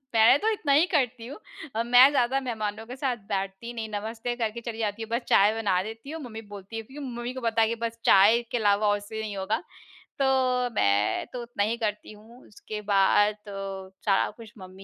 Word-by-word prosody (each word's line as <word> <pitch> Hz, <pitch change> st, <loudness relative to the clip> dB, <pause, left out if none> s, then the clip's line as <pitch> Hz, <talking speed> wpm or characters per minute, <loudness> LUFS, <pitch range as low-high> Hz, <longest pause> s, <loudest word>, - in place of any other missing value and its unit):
मैं 225 Hz, +4 st, +7 dB
तो 440 Hz, -, +1 dB
इतना 310 Hz, -9 st, -1 dB
ही 300 Hz, +5 st, +5 dB
करती 250 Hz, -5 st, 0 dB
हूँ। 270 Hz, -, -7 dB
मैं 245 Hz, +3 st, +8 dB
ज़्यादा 265 Hz, -1 st, +2 dB
मेहमानों 220 Hz, -3 st, -4 dB
के 245 Hz, +2 st, -8 dB
साथ 265 Hz, -2 st, -1 dB
बैठती 195 Hz, +4 st, -3 dB
नहीं, 225 Hz, -2 st, -5 dB
नमस्ते 225 Hz, +3 st, -4 dB
करके 235 Hz, -1 st, -3 dB
चली 230 Hz, -1 st, -6 dB
जाती 215 Hz, 0 st, -2 dB
हूँ, 225 Hz, -, -9 dB
बस 235 Hz, +2 st, 0 dB
चाय 205 Hz, +2 st, +5 dB
बना 200 Hz, -5 st, +1 dB
देती 225 Hz, +6 st, -8 dB
हूँ। 320 Hz, 0 st, -6 dB
मम्मी 225 Hz, -3 st, -8 dB
बोलती 200 Hz, +1 st, -10 dB
है 225 Hz, -, -3 dB
क्योंकि 275 Hz, +6 st, -9 dB
मम्मी 240 Hz, 0 st, -5 dB
को 260 Hz, -, -7 dB
पता 230 Hz, -1 st, +1 dB
है 225 Hz, +1 st, +2 dB
बस 230 Hz, 0 st, -3 dB
चाय 210 Hz, +5 st, +6 dB
के -, -, 0 dB
अलावा 210 Hz, -1 st, +2 dB
और 205 Hz, 0 st, +3 dB
उससे 210 Hz, +2 st, -8 dB
नहीं 215 Hz, -2 st, -5 dB
होगा, 190 Hz, +2 st, -1 dB, 0.6 s
तो 255 Hz, -2 st, +2 dB
मैं 100 Hz, +1 st, +2 dB
तो 250 Hz, -, -4 dB
उतना 235 Hz, -3 st, -2 dB
ही 225 Hz, +3 st, -1 dB
करती 210 Hz, -3 st, -3 dB
हूँ। 225 Hz, +4 st, -16 dB
उसके 210 Hz, 0 st, -8 dB
बाद 205 Hz, +2 st, +4 dB
तो 200 Hz, -1 st, -7 dB, 0.5 s
सारा 195 Hz, -2 st, +2 dB
कुछ 230 Hz, -2 st, -12 dB
मम्मी 190 Hz, 0 st, -12 dB
225 Hz, 210 wpm, -26 LUFS, 205-245 Hz, 0.6 s, मैं